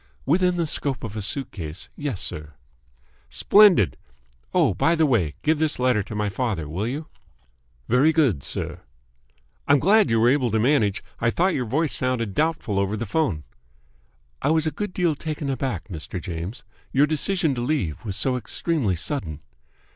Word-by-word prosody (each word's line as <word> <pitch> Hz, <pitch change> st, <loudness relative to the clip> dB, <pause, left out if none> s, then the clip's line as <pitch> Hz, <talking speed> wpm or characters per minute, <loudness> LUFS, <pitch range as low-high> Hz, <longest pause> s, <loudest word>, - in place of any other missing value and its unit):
"Within 180 Hz, +4 st, +2 dB
the 170 Hz, -, +1 dB
scope 140 Hz, -4 st, -1 dB
of 110 Hz, -2 st, -6 dB
a 110 Hz, -, -3 dB
suitcase, 95 Hz, -, -4 dB
yes, 140 Hz, -10 st, -3 dB
sir." 75 Hz, -1 st, -6 dB, 0.7 s
"Splendid! 200 Hz, -, +5 dB, 0.5 s
Oh, -, -, +3 dB
by 165 Hz, -, +2 dB
the 160 Hz, -1 st, +3 dB
way, 100 Hz, -, +1 dB
give 155 Hz, 0 st, +2 dB
this 155 Hz, -1 st, +1 dB
letter 125 Hz, -4 st, +2 dB
to 105 Hz, -, -7 dB
my 105 Hz, 0 st, 0 dB
father, 100 Hz, -, -2 dB
will 90 Hz, +9 st, -3 dB
you?" 145 Hz, +6 st, -4 dB, 0.8 s
"Very 130 Hz, +7 st, +4 dB
good, 135 Hz, -, +2 dB
sir." -, -, -3 dB, 0.9 s
"I'm 145 Hz, -, +6 dB
glad 205 Hz, +8 st, +4 dB
you 115 Hz, -, +2 dB
were 115 Hz, +2 st, +5 dB
able 130 Hz, -2 st, +2 dB
to 110 Hz, 0 st, +1 dB
manage. 110 Hz, -5 st, +2 dB, 0.2 s
I 115 Hz, -, +2 dB
thought 180 Hz, +9 st, +1 dB
your 125 Hz, -, -1 dB
voice 150 Hz, +6 st, +1 dB
sounded 125 Hz, -5 st, 0 dB
doubtful 150 Hz, -10 st, 0 dB
over 100 Hz, +2 st, -1 dB
the 120 Hz, -, -3 dB
phone." 105 Hz, -, -1 dB, 1.0 s
"I -, -, +1 dB
was 160 Hz, 0 st, +2 dB
a 155 Hz, -, 0 dB
good 210 Hz, +3 st, -4 dB
deal 175 Hz, -3 st, +1 dB
taken 150 Hz, -1 st, -4 dB
aback, 125 Hz, -10 st, -3 dB
Mr. 90 Hz, -1 st, -6 dB
James. 85 Hz, -, -6 dB, 0.3 s
Your 140 Hz, +2 st, +4 dB
decision 160 Hz, +1 st, 0 dB
to 120 Hz, -, -3 dB
leave 120 Hz, -, -2 dB
was 100 Hz, -4 st, -4 dB
so 130 Hz, +3 st, 0 dB
extremely 125 Hz, -, -1 dB
sudden." 85 Hz, -, -3 dB
130 Hz, 170 wpm, -24 LUFS, 100-155 Hz, 1.0 s, I'm